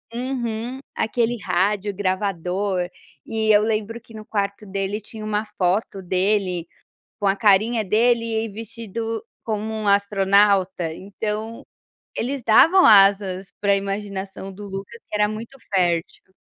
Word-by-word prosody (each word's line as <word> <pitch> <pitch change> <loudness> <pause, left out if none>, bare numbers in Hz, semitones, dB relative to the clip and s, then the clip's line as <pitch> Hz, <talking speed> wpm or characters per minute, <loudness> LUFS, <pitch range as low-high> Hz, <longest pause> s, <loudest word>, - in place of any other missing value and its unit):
Uhum. 245 -1 -3 0.2
Aquele 235 0 0
rádio 200 +3 0
gravador, 185 -1 -1 0.4
e 220 -1 -1
eu 210 0 +5
lembro 220 +1 -1
que 225 - -18
no 215 -1 -8
quarto 200 -1 -2
dele 195 +1 -3
tinha 215 +1 -9
uma 210 0 0
foto 190 +1 0
dele, 185 -2 0 0.5
com 205 - +1
a 195 - +3
carinha 215 +2 +3
dele, 230 +4 +3 0.2
e 225 - -4
vestido 225 +1 -5 0.2
como 220 0 -3
um 215 -1 -3
astronauta, 200 -3 +3
então, 210 +5 -5 0.5
eles 260 +1 -3
davam 330 +12 +6
asas 195 -2 +5
para 200 -1 +3
imaginação 195 -1 -4
do 205 +2 -9
Lucas, 195 - -7
que - - -4
era 210 0 +3
muito 225 +5 -7 0.2
fértil. 175 0 0
205 Hz, 130 wpm, -22 LUFS, 195-220 Hz, 0.5 s, davam